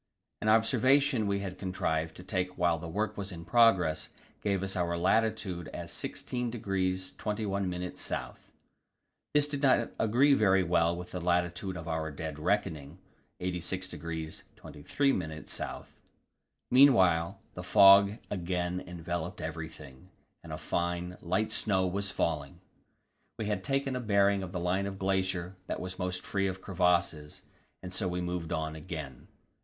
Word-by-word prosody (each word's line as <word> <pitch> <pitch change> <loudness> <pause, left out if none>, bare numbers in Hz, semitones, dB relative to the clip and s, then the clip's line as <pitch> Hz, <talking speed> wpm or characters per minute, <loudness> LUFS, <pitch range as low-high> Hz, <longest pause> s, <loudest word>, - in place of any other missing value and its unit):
An 110 - +1
observation 125 +2 +4
we 100 0 0
had 95 -2 -6
contrived 80 -4 -1
to 90 - -10
take 90 -1 -2
while 85 -2 +2
the 85 - -6
work 105 +5 -2
was 100 0 -5
in 85 -1 -8
progress 95 -9 +4 0.3
gave 100 -2 0
us 95 0 -2
our 85 -1 0
latitude 95 -2 +1
as - - -5
86° 95 -7 -2
21' 100 -3 -2
S. 90 - -5 1.2
This 145 0 +5
did 145 -1 -4
not 130 -4 +3
agree 125 +6 +4
very 95 -6 +4
well 85 0 +2
with 90 0 -8
the 90 - -4
latitude 90 +2 0
of 80 -2 -7
our 80 -1 -2
dead 75 0 -6
reckoning 75 0 -1 0.4
86° 85 -3 -4
23' 135 - -1
S. 80 -1 -5 1.1
Meanwhile 95 -11 +5
the - - -6
fog 100 -1 +8
had 105 +3 -9
again 90 -1 -2
enveloped 85 0 -4
everything, 80 -1 -7 0.3
and - - -9
a - - -3
fine, 90 +1 -2
light 95 +5 0
snow 95 -3 +1
was 100 +2 -1
falling. 75 -6 -2 0.8
We 110 - -3
had 105 -3 -1
taken 135 +1 0
a - - -1
bearing 100 -3 +3
of 95 -2 -6
the 90 - -3
line 90 +3 0
of 95 -1 -5
glacier 95 -1 -1
that - - -3
was 90 0 -6
most 90 -1 -2
free 100 -1 0
of 95 0 -4
crevasses, 85 -5 0 0.4
and 90 0 -7
so 95 0 -1
we 90 0 -2
moved 90 -2 -3
on 80 -1 -2
again. 75 -4 -7
90 Hz, 150 wpm, -30 LUFS, 85-100 Hz, 1.2 s, fog